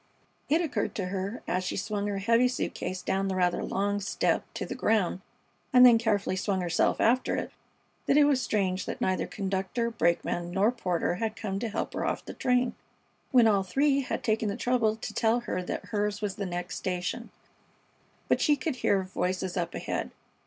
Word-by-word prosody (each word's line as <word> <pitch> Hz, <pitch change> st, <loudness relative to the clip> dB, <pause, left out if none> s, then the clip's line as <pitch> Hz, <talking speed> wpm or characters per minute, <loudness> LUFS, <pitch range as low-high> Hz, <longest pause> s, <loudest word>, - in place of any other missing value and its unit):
It 320 Hz, +4 st, +3 dB
occurred 260 Hz, -11 st, -2 dB
to 195 Hz, -, -2 dB
her, 195 Hz, +5 st, -4 dB
as 185 Hz, +1 st, 0 dB
she 180 Hz, -, -3 dB
swung 205 Hz, 0 st, -2 dB
her 200 Hz, -1 st, -2 dB
heavy 230 Hz, +5 st, +3 dB
suit 250 Hz, -, -2 dB
case 185 Hz, 0 st, -4 dB
down 195 Hz, +1 st, 0 dB
the 190 Hz, -, -1 dB
rather 180 Hz, -1 st, +1 dB
long 205 Hz, +1 st, -1 dB
step 200 Hz, -, 0 dB
to -, -, -3 dB
the -, -, -5 dB
ground, 195 Hz, -4 st, +1 dB, 0.5 s
and 250 Hz, -2 st, +8 dB
then 235 Hz, -2 st, +7 dB
carefully 205 Hz, -4 st, 0 dB
swung 190 Hz, 0 st, -1 dB
herself 175 Hz, -1 st, +1 dB
after 250 Hz, +3 st, +2 dB
it, -, -, -3 dB, 0.6 s
that 275 Hz, -, +4 dB
it 300 Hz, -, +7 dB
was 285 Hz, -3 st, +3 dB
strange 190 Hz, -5 st, -1 dB
that -, -, -4 dB
neither 185 Hz, 0 st, 0 dB
conductor, 195 Hz, +4 st, -2 dB
brakeman, 170 Hz, -3 st, 0 dB
nor 195 Hz, +6 st, +2 dB
porter 180 Hz, -7 st, -1 dB
had 220 Hz, +1 st, -2 dB
come 200 Hz, -2 st, -3 dB
to 230 Hz, +1 st, -2 dB
help -, -, -3 dB
her -, -, -2 dB
off -, -, -2 dB
the -, -, -7 dB
train, 250 Hz, -1 st, +1 dB, 0.6 s
when 245 Hz, -3 st, +6 dB
all 205 Hz, -3 st, +4 dB
three 275 Hz, +9 st, +2 dB
had 260 Hz, -, -4 dB
taken 220 Hz, -1 st, +1 dB
the 200 Hz, -, -3 dB
trouble 240 Hz, -4 st, +1 dB
to 220 Hz, -, -7 dB
tell 230 Hz, +1 st, +2 dB
her 185 Hz, -, -3 dB
that 180 Hz, -, -4 dB
hers 205 Hz, -1 st, -1 dB
was 205 Hz, -2 st, -2 dB
the 200 Hz, 0 st, -4 dB
next 175 Hz, 0 st, -4 dB
station; 185 Hz, +6 st, -3 dB, 1.0 s
but -, -, +2 dB
she 295 Hz, -, +4 dB
could 285 Hz, -1 st, -3 dB
hear 195 Hz, -5 st, +2 dB
voices 185 Hz, 0 st, -2 dB
up 175 Hz, -2 st, -2 dB
ahead. -, -, -3 dB
205 Hz, 195 wpm, -28 LUFS, 185-235 Hz, 1.0 s, and